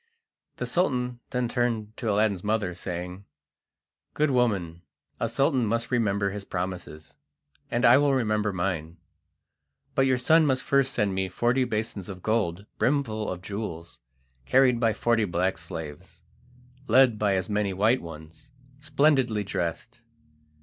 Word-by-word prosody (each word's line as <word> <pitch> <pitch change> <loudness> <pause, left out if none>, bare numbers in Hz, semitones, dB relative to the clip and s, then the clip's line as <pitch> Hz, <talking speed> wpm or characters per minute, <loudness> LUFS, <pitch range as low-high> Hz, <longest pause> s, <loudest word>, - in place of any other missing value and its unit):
The - - -4
Sultan 125 -8 0
then 125 -1 -1
turned 115 -3 -1
to 115 - -2
Aladdin's 100 -3 +1
mother, 105 -4 0
saying: 90 +2 -6 0.9
"Good 150 -1 +2
woman, 100 -10 0 0.4
a 115 - -1
Sultan 135 +2 +2
must 115 +3 -1
remember 100 -5 +1
his 105 0 -6
promises, 90 -5 -6 0.5
and 120 +1 +1
I 130 - +7
will 145 -1 +3
remember 105 -4 0
mine, 85 -3 -3 1.0
but 135 0 +3
your 130 -1 +3
son 155 +5 +4
must 130 -2 +1
first 135 -1 +1
send 105 -4 +1
me 95 0 -1
forty 120 +7 +1
basins 110 -4 -3
of 95 -2 -8
gold 100 -4 0
brimful 120 -6 0
of 90 0 -6
jewels, 90 - -6 0.5
carried 130 -2 +4
by 115 -2 +2
forty 115 +1 +1
black 90 0 -1
slaves, 80 -5 -8 0.6
led 120 -1 +5
by 100 -2 +2
as 95 -1 -1
many 105 -1 0
white 110 +7 +2
ones, 80 -1 -11 0.3
splendidly 140 -7 +2
dressed. 85 -4 -4
110 Hz, 140 wpm, -26 LUFS, 95-125 Hz, 1.0 s, I